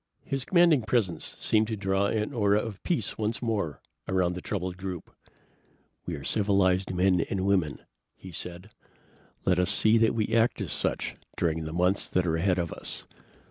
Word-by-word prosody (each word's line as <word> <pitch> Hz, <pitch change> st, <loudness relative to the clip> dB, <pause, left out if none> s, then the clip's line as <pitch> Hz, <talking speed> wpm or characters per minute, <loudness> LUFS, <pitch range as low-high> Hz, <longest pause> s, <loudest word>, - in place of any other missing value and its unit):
His 135 Hz, -2 st, -3 dB
commanding 170 Hz, -6 st, +5 dB
presence 110 Hz, -5 st, -1 dB
seemed 110 Hz, 0 st, +2 dB
to 110 Hz, -, -2 dB
draw 95 Hz, 0 st, +1 dB
an 105 Hz, 0 st, -1 dB
aura 105 Hz, -3 st, +3 dB
of 105 Hz, -3 st, -6 dB
peace 135 Hz, -, -1 dB
once 110 Hz, +1 st, -1 dB
more 105 Hz, -, -2 dB, 0.3 s
around 90 Hz, -2 st, +1 dB
the 90 Hz, -, -6 dB
troubled 90 Hz, -3 st, -3 dB
group. 95 Hz, -3 st, -7 dB, 0.9 s
"We 85 Hz, -, -2 dB
are 70 Hz, -, -8 dB
civilized 95 Hz, -1 st, +2 dB
men 90 Hz, -1 st, +3 dB
and 95 Hz, -1 st, -1 dB
women," 90 Hz, -7 st, 0 dB, 0.3 s
he 95 Hz, -, -11 dB
said. 90 Hz, +4 st, -5 dB, 0.7 s
"Let 90 Hz, -1 st, +3 dB
us 90 Hz, 0 st, +2 dB
see 110 Hz, +3 st, +5 dB
that 115 Hz, 0 st, +3 dB
we 110 Hz, -2 st, 0 dB
act 115 Hz, +1 st, +3 dB
as -, -, -4 dB
such -, -, -1 dB, 0.2 s
during 80 Hz, -2 st, 0 dB
the 80 Hz, -, -5 dB
months 90 Hz, +4 st, +1 dB
that 90 Hz, -1 st, +1 dB
are 80 Hz, -1 st, +1 dB
ahead 90 Hz, +2 st, +2 dB
of 85 Hz, -3 st, -2 dB
us. -, -, -5 dB
95 Hz, 180 wpm, -28 LUFS, 90-110 Hz, 0.9 s, commanding